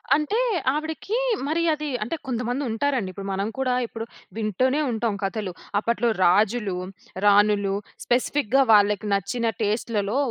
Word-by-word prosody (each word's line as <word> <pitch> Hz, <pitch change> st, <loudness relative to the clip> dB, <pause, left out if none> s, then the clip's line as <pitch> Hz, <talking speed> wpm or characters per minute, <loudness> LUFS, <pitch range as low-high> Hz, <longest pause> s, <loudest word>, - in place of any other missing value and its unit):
అంటే, 310 Hz, -, 0 dB, 0.3 s
ఆవిడికీ 315 Hz, +8 st, -3 dB, 0.3 s
మరి 320 Hz, +3 st, 0 dB
అదీ, 305 Hz, 0 st, -4 dB, 0.2 s
అంటే 240 Hz, -, -3 dB
కొంతమందుంటారండి, 245 Hz, -1 st, -1 dB
ఇప్పుడు, 195 Hz, +1 st, -7 dB
మనం 195 Hz, +2 st, -1 dB
కూడా 255 Hz, -1 st, +1 dB
ఇప్పుడు 225 Hz, 0 st, -6 dB, 0.3 s
వింటూనే 255 Hz, +7 st, +1 dB
ఉంటాం 225 Hz, -2 st, -1 dB
కథలు. 195 Hz, -1 st, -2 dB, 0.3 s
అప్పట్లో 235 Hz, +2 st, +1 dB
రాజులు, 205 Hz, +2 st, +3 dB, 0.5 s
రాణులు 205 Hz, -1 st, +4 dB, 0.3 s
స్పెసిఫిక్‌గా 260 Hz, +1 st, +2 dB
వాళ్ళకి 210 Hz, 0 st, +4 dB
నచ్చిన 200 Hz, +5 st, -1 dB, 0.2 s
టెస్ట్‌లలో 215 Hz, +1 st, -1 dB
225 Hz, 115 wpm, -24 LUFS, 205-265 Hz, 0.5 s, రాణులు